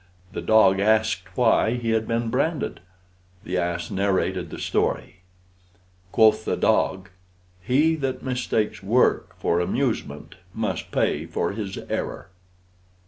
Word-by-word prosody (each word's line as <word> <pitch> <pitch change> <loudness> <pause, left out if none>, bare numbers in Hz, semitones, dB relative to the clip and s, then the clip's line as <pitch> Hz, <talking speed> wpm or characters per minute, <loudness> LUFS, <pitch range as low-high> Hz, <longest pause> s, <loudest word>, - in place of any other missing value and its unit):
The - - -4
dog 110 -3 +4
asked 105 -3 +1
why 115 -1 +3
he 120 -2 -2
had 110 -1 0
been 115 0 -1
branded. 150 +5 -1 0.6
The 90 0 -2
ass 85 -1 -2
narrated 95 0 0
the - - -7
story. - - -1 0.9
Quoth 110 0 +4
the - - -1
dog, 95 0 +1 0.5
"He 145 - +3
that 135 -3 -3
mistakes 125 -4 -1
work 115 +6 +2
for 85 - +1
amusement 90 - -2 0.2
must - - -3
pay 80 +3 0
for 85 0 -1
his 100 -2 -5
error." - - -4
110 Hz, 125 wpm, -24 LUFS, 95-120 Hz, 0.9 s, dog